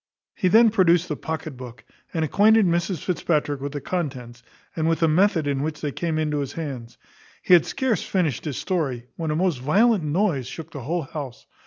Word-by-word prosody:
He 185 - 0
then 220 +4 +6
produced 180 -4 +3
the 150 - -1
pocket 160 -1 -5
book, 125 -2 -10 0.3
and 160 -1 0
acquainted 215 +5 +4
Mrs 170 -1 0
Fitzpatrick 150 -5 -1
with 140 0 -4
the 145 - -4
contents, 130 -9 -4 0.3
and 160 0 0
with 165 +1 0
the 165 - +4
method 170 0 +3
in 140 -1 -1
which 150 +1 -3
they 145 - -3
came 165 +2 -2
into 150 -2 0
his 140 -2 -4
hands. 130 -8 -6 0.5
He - - +4
had 170 -3 +6
scarce 260 -5 0
finished 165 - -1
his 145 -4 -3
story, 135 -10 -2
when 165 -2 -3
a 150 - 0
most 175 -5 0
violent 200 - +3
noise 150 - 0
shook 160 +3 -8
the 140 - -7
whole 165 +7 -2
house. 135 -3 -8
160 Hz, 200 wpm, -23 LUFS, 140-180 Hz, 0.5 s, then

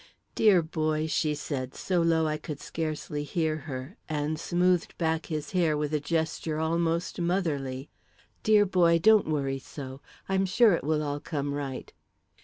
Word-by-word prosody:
"Dear 195 -6 +5
boy," 155 -1 -1
she 155 -1 0
said, 135 -3 -4
so 180 -2 0
low 165 -1 +3
I 155 0 0
could 150 -1 -7
scarcely 155 -2 -4
hear 155 +1 0
her, 130 - -6
and 155 0 -1
smoothed 180 +1 +1
back 160 -1 0
his 150 -2 -4
hair 170 -5 +2
with 150 0 -2
a 150 - +2
gesture 160 0 -1
almost 170 +2 0
motherly, 150 -7 -1 0.5
"dear 215 -2 +5
boy, 175 -3 +4
don't 215 +4 +5
worry 135 -3 -1
so. 135 0 -9 0.3
I'm 195 0 +1
sure 220 +2 +5
it 170 - -1
will 155 +1 +1
all 145 0 -2
come 145 -2 -3
right." 140 -2 -5
155 Hz, 160 wpm, -28 LUFS, 145-170 Hz, 0.5 s, Dear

